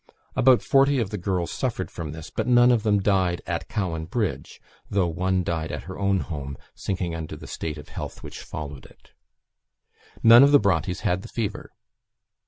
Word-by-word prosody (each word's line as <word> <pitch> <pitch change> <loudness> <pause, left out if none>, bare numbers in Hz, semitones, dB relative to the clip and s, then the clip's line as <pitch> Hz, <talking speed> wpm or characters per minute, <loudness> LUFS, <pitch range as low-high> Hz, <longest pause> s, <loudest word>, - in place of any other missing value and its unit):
About 130 -1 +5
forty 135 +1 +4
of 110 -5 -1
the 105 - -3
girls 90 -1 -1
suffered - - -3
from 80 -3 -6
this, 80 0 -9
but - - -2
none 120 0 +6
of 120 -3 +3
them 105 -2 +2
died 95 -3 +2
at 85 -1 -3
Cowan 90 -8 -2
Bridge; 105 +3 -3 0.3
though 100 -2 +2
one 90 +2 0
died 80 -2 -2
at - - -5
her 95 +1 -8
own 100 -2 +2
home, 70 -5 -6 0.2
sinking 90 -3 -3
under 80 -2 -5
the - - -11
state 80 -1 -5
of 75 - -11
health - - -7
which - - -8
followed 70 -3 -7
it. - - -24 1.1
None 115 +2 +9
of 140 +1 +6
the 145 - +7
Brontes 90 -3 0
had 90 +2 0
the - - -9
fever. 110 -4 -4
95 Hz, 190 wpm, -25 LUFS, 80-110 Hz, 1.1 s, None